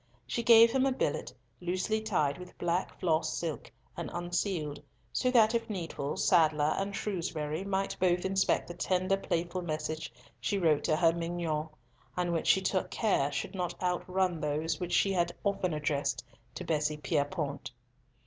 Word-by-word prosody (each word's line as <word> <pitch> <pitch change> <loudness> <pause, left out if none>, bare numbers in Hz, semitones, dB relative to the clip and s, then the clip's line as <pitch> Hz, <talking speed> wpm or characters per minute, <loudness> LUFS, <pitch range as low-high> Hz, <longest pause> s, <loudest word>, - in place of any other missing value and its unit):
She 130 - -2
gave 230 0 +8
him 265 +1 +2
a - - +2
billet, 150 - -1 0.3
loosely 185 +5 -1
tied 180 -8 0
with 180 - -11
black 175 +1 -1
floss 165 -3 +1
silk 165 -3 -4 0.2
and - - -4
unsealed, 175 -3 -2 0.3
so 255 - +1
that 225 -3 +5
if 230 0 -1
needful, 165 -7 -3
Sadler 155 -3 +3
and 200 +1 -2
Shrewsbury 165 -5 -2
might 195 0 -1
both 180 -1 +2
inspect 190 0 +1
the 175 - -6
tender, 185 +2 +1
playful, 175 -1 -2
messages 155 -1 -3 0.3
she 200 +11 -1
wrote 160 -6 +3
to 155 - +3
her 165 0 +4
"mignonne," 165 -2 -2 0.5
and 175 -1 0
which 165 - -1
she 190 - +5
took 185 0 0
care 170 -10 +1
should 140 +6 -3
not 180 -3 -3
outrun 180 -1 0
those 155 +1 -1
which 180 -1 -3
she 195 - +3
had 175 -1 +1
often 195 -3 0
addressed 150 -2 -1 0.3
to - - -5
Bessie 150 -1 0
Pierrepoint. 150 -1 -2
175 Hz, 160 wpm, -31 LUFS, 155-190 Hz, 0.5 s, gave